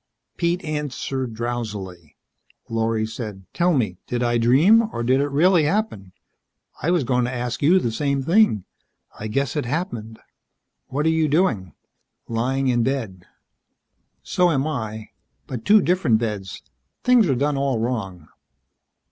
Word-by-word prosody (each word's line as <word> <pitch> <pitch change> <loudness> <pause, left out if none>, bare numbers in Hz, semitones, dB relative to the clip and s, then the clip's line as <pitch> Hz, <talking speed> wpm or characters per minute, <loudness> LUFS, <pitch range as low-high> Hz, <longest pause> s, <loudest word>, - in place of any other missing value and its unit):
Pete 170 +1 0
answered 135 -5 -3
drowsily. 105 -8 -5 0.5
Lorry 115 -1 0
said, 110 -4 -7
"Tell 175 +1 +2
me 110 - 0
did 125 0 -1
I 120 0 +1
dream, 175 - +5
or 120 - -3
did 130 +3 +3
it 145 - +1
really 165 +3 +4
happen." 150 - -2 0.7
"I 165 - 0
was 175 -4 +2
going 125 0 +1
to 125 - -3
ask 125 -1 -3
you 165 +6 +5
the 120 -11 0
same 140 +3 -1
thing. 165 - +3 0.5
I 110 - -4
guess 135 +3 -1
it - - -1
happened. 120 - -4 0.7
What 145 +3 -2
are - - +4
you 160 -1 +2
doing?" 140 - 0 0.5
"Lying 130 +4 -1
in 120 -2 +2
bed." 115 -8 -3 1.0
"So 180 -1 +2
am 140 -4 +1
I. 110 -8 -4 0.3
But 125 -4 -7
two 210 0 +6
different 175 -11 +2
beds. 105 -4 -4 0.4
Things 245 -7 +4
are 135 - +2
done 145 +3 0
all 135 -2 0
wrong." 105 -8 -3
125 Hz, 150 wpm, -22 LUFS, 110-155 Hz, 1.0 s, two